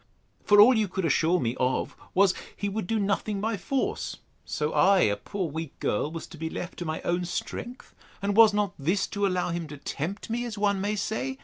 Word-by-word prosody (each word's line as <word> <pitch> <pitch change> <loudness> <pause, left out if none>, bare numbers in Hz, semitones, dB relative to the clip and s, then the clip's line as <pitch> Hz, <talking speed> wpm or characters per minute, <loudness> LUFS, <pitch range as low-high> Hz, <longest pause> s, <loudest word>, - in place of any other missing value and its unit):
for 205 0 +5
all 240 +5 +9
you 215 -2 +2
could 190 0 -2
assure 165 +3 +3
me 120 -1 -1
of, 130 0 0 0.2
was, 195 0 +5 0.2
he 205 - -2
would 200 -2 -3
do 225 - 0
nothing 205 0 0
by 220 +2 -1
force; 225 +8 -2 0.3
so 150 0 -2
I, 195 -1 +5
a 100 - +3
poor 185 - -4
weak 160 -1 -6
girl, 145 +8 0
was 165 0 -6
to 165 - -12
be 160 0 -3
left 175 +2 -6
to 175 - -4
my 155 0 -3
own 175 +1 0
strength! 240 +7 -5 0.3
And 200 +1 -1
was 225 -1 +8
not 205 -2 0
this 175 +8 +1
to 205 -1 -1
allow 180 -2 0
him 170 -1 -3
to 150 0 -9
tempt 165 +8 -4
me, 240 +1 -1
as 230 -3 -5
one 200 -1 +1
may 205 +2 0
say? 220 +6 -2
195 Hz, 220 wpm, -27 LUFS, 165-210 Hz, 0.3 s, all